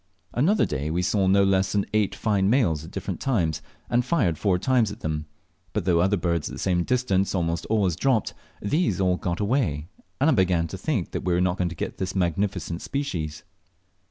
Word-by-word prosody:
Another 175 - +3
day 70 +3 -3
we 85 +3 0
saw 95 +1 +2
no 100 +1 +5
less 95 0 +2
than 100 -1 +1
eight 105 -2 +1
fine 100 -3 +1
males 100 - +2
at 80 - -9
different 95 -1 -5
times, 90 - 0 0.3
and 120 +1 +2
fired 120 - +1
four 95 -4 +2
times 120 +1 +2
at 105 - -10
them; 75 -1 -3 0.5
but - - -1
though 85 -2 +3
other 95 +4 +3
birds 85 -3 -1
at - - -8
the - - -6
same 90 -2 +1
distance 100 -5 +1
almost 85 -2 -1
always 100 -6 +1
dropped, 120 +3 +1 0.3
these 150 - 0
all 90 -1 +2
got 85 -1 -3
away, 100 - 0 0.3
and 140 - +3
I 160 - +5
began 90 -3 +2
to 95 - -6
think 110 - -1
we - - -1
were 90 -1 0
not 90 0 +1
to 85 -1 -1
get - - -5
this 95 0 -3
magnificent 90 -1 -1
species. 80 - -3
95 Hz, 200 wpm, -25 LUFS, 85-110 Hz, 0.5 s, no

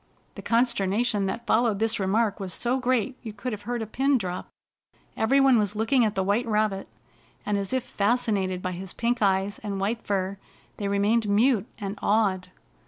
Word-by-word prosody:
The - - -9
consternation 225 -3 +1
that 235 +5 -4
followed 225 -2 +2
this 225 +1 0
remark 200 +2 +1
was 190 -3 -3
so 250 +2 0
great 255 0 0
you 220 -4 -7
could 230 +3 -4
have 210 - -6
heard 240 -2 -1
a - - -4
pin 270 +5 +1
drop. 185 -5 -4 0.7
Every 265 +5 +3
one 270 -4 +5
was 205 0 0
looking 230 +4 +2
at 215 -2 0
the 190 - +1
white 205 +5 +1
rabbit, 210 -3 0 0.6
and, 210 - 0
as 200 -1 -2
if 260 -1 0
fascinated 200 -4 0
by 185 - -1
his 185 +1 -6
pink 235 0 -1
eyes 195 0 +1
and 200 -2 -4
white 220 +4 -1
fur, 195 -1 -2 0.4
they 200 - -2
remained 205 +2 +1
mute 220 +1 +3
and 200 -1 -5
awed. 200 -4 +1
210 Hz, 185 wpm, -26 LUFS, 195-235 Hz, 0.7 s, one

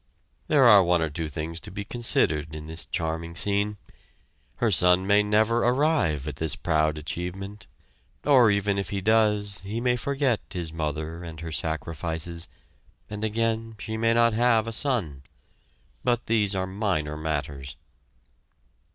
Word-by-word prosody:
There 145 -3 +4
are 105 -5 +8
one 90 0 +2
or 80 - -2
two 80 +1 -4
things 80 +3 -5
to - - -9
be 100 +1 -6
considered 80 -10 +1
in 75 0 -7
this 80 +2 -6
charming 80 0 -3
scene. 100 +3 +1 0.8
Her 115 -3 +1
son 90 0 +5
may 100 +1 +4
never 110 +3 +2
arrive 120 - +1
at 75 -2 -5
this 80 -1 -2
proud 80 0 +1
achievement, 90 +6 -6 0.6
or 130 -6 +6
even 100 -1 +1
if 95 - -3
he 100 - -2
does, 105 -1 +2
he 105 +4 -4
may 125 0 +2
forget 135 -2 0
his 85 -5 -4
mother 80 +1 -4
and 80 -2 -8
her 85 -1 -6
sacrifices, 80 +2 -3 0.6
and 105 0 -5
again 115 +1 -1
she 110 +1 -5
may 115 +1 +2
not 115 -1 +4
have 115 -1 +3
a 115 - -4
son. 110 - -1 0.8
But 120 -1 +1
these 105 -3 +1
are 95 0 0
minor 95 -6 -2
matters. 70 -4 -4
95 Hz, 150 wpm, -26 LUFS, 80-110 Hz, 0.8 s, are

